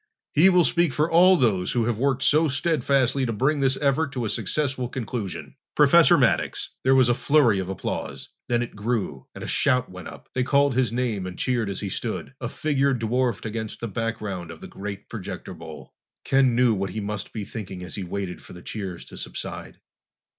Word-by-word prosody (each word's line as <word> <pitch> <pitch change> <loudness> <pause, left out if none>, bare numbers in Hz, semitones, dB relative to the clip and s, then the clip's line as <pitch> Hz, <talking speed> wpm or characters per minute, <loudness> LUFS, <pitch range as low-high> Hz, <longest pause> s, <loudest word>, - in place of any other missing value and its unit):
He 170 +6 +6
will 180 -2 +5
speak 170 -5 +2
for 150 +4 +1
all 180 +3 +7
those 100 - +1
who 120 -2 +1
have 115 -2 -1
worked 135 0 +1
so 155 +2 +4
steadfastly 140 -3 +1
to - - -1
bring 135 +7 +1
this 135 -1 +2
effort 140 +1 +1
to 125 -3 -2
a - - -1
successful 130 +4 -1
conclusion. 115 -6 -5 0.2
Professor - - +6
Maddox!" - - +1
There 130 +1 +4
was 130 -2 +5
a 120 - +4
flurry 125 -6 +3
of 95 -1 -4
applause. 95 - -4 0.2
Then 120 0 +2
it 120 - -8
grew, 100 - -2
and - - -7
a - - -5
shout 125 -5 +1
went 90 -1 -9
up. - - -11
They 130 - 0
called 140 +1 +3
his 125 -3 +1
name 115 -6 -1
and 90 - -8
cheered 120 -5 0
as 100 - -4
he 100 - -3
stood, 115 +6 -4
a 120 - -3
figure 140 -2 +1
dwarfed 120 -1 -1
against 110 0 -4
the 115 - -3
background 105 -5 -4
of - - -9
the - - -9
great 100 0 -7
projector - - -7
bowl. 80 -1 -11 0.3
Ken 135 -3 +3
knew 125 -1 +4
what 100 -1 -2
he 110 - -4
must 105 0 -4
be 105 -3 -5
thinking 95 -4 -7
as 90 - -8
he 100 - -4
waited 95 0 -5
for - - -13
the 90 - -11
cheers 95 -5 -6
to - - -12
subside. - - -6
120 Hz, 205 wpm, -25 LUFS, 100-135 Hz, 0.3 s, all